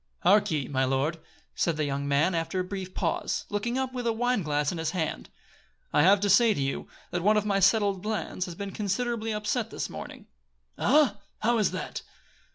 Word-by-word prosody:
"Hark 205 +1 +4
ye, 150 -5 -1
my 130 -1 0
lord," 135 +5 0 0.3
said 170 -3 0
the 155 - 0
young 140 0 -2
man, 145 +6 +2
after 165 +3 -1
a - - +1
brief 185 0 -6
pause, - - -1
looking 230 +5 -1
up 260 -1 -2
with 245 -2 -3
a - - +3
wine 245 0 +1
glass 150 -2 0
in 175 - -5
his 160 - -1
hand, 160 -3 -3 0.6
"I - - +5
have 195 +5 +6
to 205 - +2
say 215 +3 +5
to - - -3
you, 135 0 -2 0.2
that 175 - -1
one 210 +4 +4
of 210 - +1
my 200 -2 +1
settled 195 -1 +3
plans 210 -3 -3
has 175 -3 -7
been 200 +2 -5
considerably 220 +3 -2
upset 215 +2 -1
this - - -4
morning." - - -8 0.5
"Ah, 270 -7 +3 0.2
how 235 +1 +2
is 210 - +3
that?" - - -5
195 Hz, 205 wpm, -27 LUFS, 160-220 Hz, 0.6 s, have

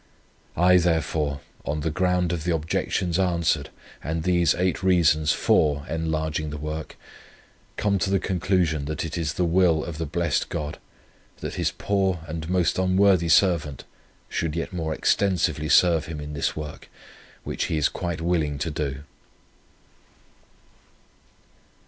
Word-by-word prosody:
"I, 90 +2 +6
therefore, 80 -4 0 0.2
on 75 +1 -2
the 80 +1 -1
ground 90 0 +1
of 80 -3 -3
the 85 -1 +1
objections 85 +2 -1
answered, 85 -5 +1 0.3
and 80 +3 -2
these 85 -2 +3
eight 90 0 0
reasons 80 -5 +3
FOR 70 -1 +2
enlarging 80 -1 -2
the 75 - -5
work, 75 +1 -5 0.8
come 100 -2 +1
to 95 - 0
the 95 0 +2
conclusion 90 -5 0
that 75 +2 -3
it 80 - -5
is 80 -3 -2
the 90 - 0
will 85 -2 +3
of 85 -2 -6
the 80 - -2
blessed 85 +3 -1
God, 75 -1 -4 0.6
that - - -4
His - - 0
poor 95 -4 -1
and 80 0 -5
most 90 -3 +1
unworthy 95 -2 +3
servant 80 -5 +3 0.4
should 80 -2 -2
yet 85 +2 -3
more 80 -3 -2
extensively 85 -2 +1
serve 85 -3 +4
Him 80 -2 -6
in 75 0 -6
this 75 - -1
work, 75 -1 -7 0.5
which - - -2
he 80 - -1
is 75 - +3
quite 85 -3 -4
willing 80 -4 0
to 80 +4 -2
do." 70 -2 -3
80 Hz, 145 wpm, -25 LUFS, 75-90 Hz, 0.8 s, I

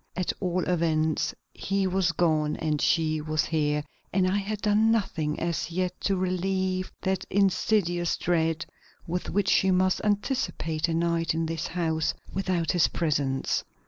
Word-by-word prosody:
At 185 -1 -1
all 180 -1 0
events, 160 -3 +1 0.2
he 195 0 -1
was 190 0 +1
gone 155 -3 +1
and 155 -2 -1
she 155 -2 +2
was 155 0 0
here, 150 -2 0 0.3
and 185 -1 +2
I 190 +2 +1
had 205 +1 -3
done 215 +1 +3
nothing 165 -9 0
as 170 -1 -2
yet 180 +1 -2
to 195 - +2
relieve 185 0 -1
that 190 0 0
insidious 190 -3 +1
dread 165 -1 0 0.4
with 180 +1 -3
which 200 0 +1
she 190 - +4
must 185 0 +2
anticipate 205 - 0
a 165 - -1
night 170 -1 +1
in 165 0 0
this 160 -1 -3
house 160 -2 -1 0.2
without 185 -3 0
his 175 -3 +4
presence. 140 -5 0
175 Hz, 150 wpm, -27 LUFS, 160-190 Hz, 0.4 s, she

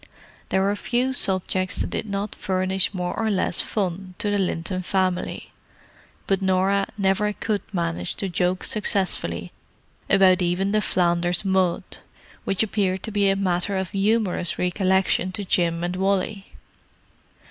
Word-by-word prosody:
There 190 - +2
were 200 +1 +1
few 250 +5 0
subjects 185 -4 0
that - - -2
did 220 - -3
not 200 +1 -3
furnish 185 0 +1
more 180 -2 -3
or 225 -1 0
less 190 -4 +1
fun 185 -2 -3
to 205 - -1
the 205 - +1
Linton 185 0 -1
family; 185 -1 -1 0.7
but 195 0 +1
Norah 190 +1 +2
never 200 +1 +2
could 210 -1 -2
manage 170 -4 -1
to 195 - -2
joke 180 +1 0
successfully 175 - -1 0.6
about 190 -1 +5
even 180 +3 +1
the 215 0 +2
Flanders 175 -1 +1
mud, 190 -2 +2 0.6
which 195 +2 +1
appeared 195 -3 0
to 220 - -4
be 200 -1 +3
a 195 - +3
matter 190 0 0
for 170 - -15
humorous 200 -3 +1
recollection 185 0 +1
to 200 +1 -2
Jim 170 -2 +1
and 175 +1 -2
Wally. 195 +1 -1
190 Hz, 145 wpm, -24 LUFS, 180-200 Hz, 0.7 s, about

